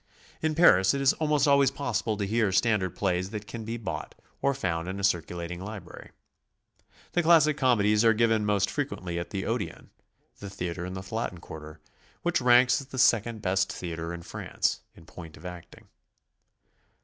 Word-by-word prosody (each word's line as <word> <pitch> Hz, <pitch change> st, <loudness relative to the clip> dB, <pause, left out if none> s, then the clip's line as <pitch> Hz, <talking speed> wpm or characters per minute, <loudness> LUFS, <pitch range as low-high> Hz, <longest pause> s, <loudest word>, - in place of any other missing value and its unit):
In 155 Hz, -1 st, 0 dB
Paris 95 Hz, -, +5 dB
it -, -, -1 dB
is 135 Hz, 0 st, +4 dB
almost 150 Hz, -2 st, +1 dB
always 140 Hz, -1 st, +5 dB
possible 115 Hz, -5 st, -2 dB
to 100 Hz, -, -1 dB
hear 110 Hz, 0 st, +1 dB
standard 100 Hz, -2 st, +1 dB
plays 95 Hz, -1 st, -1 dB
that 105 Hz, -1 st, -6 dB
can 115 Hz, +1 st, -7 dB
be 115 Hz, +1 st, -4 dB
bought, 85 Hz, -9 st, -6 dB, 0.3 s
or 140 Hz, 0 st, +1 dB
found 85 Hz, -7 st, -2 dB
in 95 Hz, +1 st, -4 dB
a -, -, -5 dB
circulating 85 Hz, -1 st, -1 dB
library. 100 Hz, -4 st, -9 dB, 1.0 s
The 175 Hz, -, +2 dB
classic 160 Hz, -3 st, +5 dB
comedies 105 Hz, -6 st, +3 dB
are 115 Hz, -, +6 dB
given 115 Hz, -1 st, +2 dB
m'ost 105 Hz, -2 st, +1 dB
frequently 90 Hz, -, -3 dB
at 85 Hz, -, -6 dB
the 95 Hz, -2 st, -4 dB
Odeon, -, -, -4 dB, 0.5 s
the 100 Hz, -, -7 dB
theatre 90 Hz, -2 st, -4 dB
in 90 Hz, -, -6 dB
the 95 Hz, -, -6 dB
Latin 110 Hz, -6 st, -3 dB
Quarter, 75 Hz, -1 st, -10 dB, 0.4 s
Which 175 Hz, -4 st, +1 dB
ranks 125 Hz, +2 st, +5 dB
as 135 Hz, -, -12 dB
the 135 Hz, -, -8 dB
second 115 Hz, -2 st, +2 dB
best 95 Hz, +1 st, +1 dB
theatre 85 Hz, -1 st, -5 dB
in 85 Hz, 0 st, -7 dB
France, -, -, -2 dB
in 80 Hz, -, -16 dB
point 80 Hz, -1 st, -11 dB
ol -, -, -15 dB
acting. 90 Hz, -2 st, -10 dB
105 Hz, 175 wpm, -27 LUFS, 90-125 Hz, 1.0 s, are